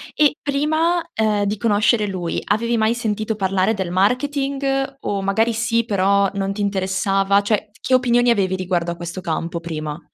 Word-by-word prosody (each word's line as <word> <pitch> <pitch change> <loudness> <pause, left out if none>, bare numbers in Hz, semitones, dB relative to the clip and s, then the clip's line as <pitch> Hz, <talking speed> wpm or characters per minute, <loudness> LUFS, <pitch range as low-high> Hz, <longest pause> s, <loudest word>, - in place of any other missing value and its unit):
E 300 -1 +3
prima, 315 +4 +1
ehm, 215 -2 +1
di 205 +1 -1
conoscere 210 0 +2
lui, 180 -3 -3
avevi 230 +3 0
mai 220 +1 +2
sentito 220 -2 -2
parlare 195 +1 +1
del 190 -3 -3
marketing? 270 +6 0
O 200 -1 -2
magari 220 +4 +1
sì, 230 0 0
però 200 -1 +2
non 195 0 -2
ti 205 - -5
interessava? 195 0 +1
Cioè 210 0 -1
t - - -25
che 260 - -1
opinioni 245 -1 +4
avevi 190 -4 +1
riguardo 180 -2 -1
a 170 - -5
questo 175 +2 -6
campo 170 0 -3
prima? 155 -2 -5
205 Hz, 170 wpm, -20 LUFS, 190-235 Hz, -, opinioni